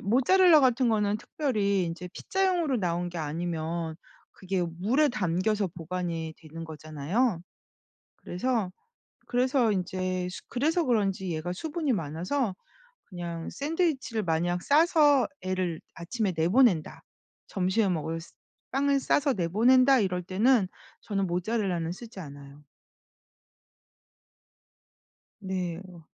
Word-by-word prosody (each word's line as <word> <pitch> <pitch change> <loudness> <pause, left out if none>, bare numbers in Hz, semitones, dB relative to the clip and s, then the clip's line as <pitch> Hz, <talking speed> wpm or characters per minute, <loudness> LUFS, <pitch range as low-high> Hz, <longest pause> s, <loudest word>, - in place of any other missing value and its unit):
모차렐라 310 - +5
같은 255 -1 +3
거는 210 -2 +1
특별히 205 - 0
인제 170 +2 -5
피자용으로 360 -8 0
나온 175 -1 -1
게 175 -1 -6
아니면 165 +1 -3 0.4
그게 190 -1 -2
물에 200 - +1
담겨서 200 -2 0
보관이 165 -1 -4
되는 165 0 -9
거잖아요. 160 - -1 0.8
그래서 215 0 -2 0.6
그래서 250 -1 +2
인제 185 -1 -2 0.2
그래서 315 +7 +1
그런지 195 - 0
얘가 165 +3 -3
수분이 305 - -2
많아서 185 - -2 0.5
그냥 170 -3 -6
샌드위치를 285 - -1
만약 175 +1 0
싸서 295 -3 +4
애를 185 -3 -2
아침에 190 +3 -2
내보낸다 175 +1 +2 0.4
점심에 190 +2 +1
먹을 165 -1 -2
쓰 165 - -15 0.4
빵을 280 +1 +2
싸서 280 +1 +2
내보낸다 250 +9 +4
이럴 180 -4 0
때는 205 +3 +3 0.3
저는 195 -2 -1
모차렐라는 180 -2 -1
쓰지 220 +2 -9
않아요. 140 -2 -11 2.8
네. 185 -3 -3
어. 170 -3 -14
190 Hz, 260 characters per minute, -28 LUFS, 170-250 Hz, 2.8 s, 모차렐라